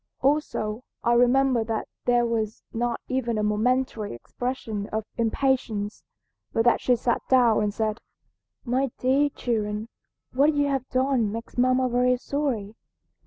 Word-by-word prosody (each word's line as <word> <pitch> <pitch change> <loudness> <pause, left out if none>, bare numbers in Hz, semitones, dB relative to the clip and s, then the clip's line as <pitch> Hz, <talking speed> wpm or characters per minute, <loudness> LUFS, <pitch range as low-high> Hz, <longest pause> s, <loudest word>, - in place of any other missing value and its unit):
"Also 265 -6 0 0.2
I 235 - +3
remember 245 0 +4
that 220 -1 -3 0.2
there 240 -1 +3
was 225 -2 -2
not 235 +1 -1
even 250 -4 -1
a 210 - 0
momentary 220 - 0
expression 220 - -4
of 220 0 -2
impatience, 230 -3 0 0.5
but 225 - +1
that 240 - +4
she 250 - +3
sat 240 0 0
down 245 -5 +5
and 210 -1 +1
said, 215 +1 -2 0.7
'My 260 +2 +1
dear 275 +3 +2
children, 215 -4 -2 0.4
what 290 +4 +3
you 290 0 +2
have 270 -2 -2
done 255 -4 +1
makes 230 +2 -7
mamma 255 +1 +3
very 250 +1 +2
sorry. 250 -7 -2
240 Hz, 140 wpm, -25 LUFS, 220-260 Hz, 0.7 s, down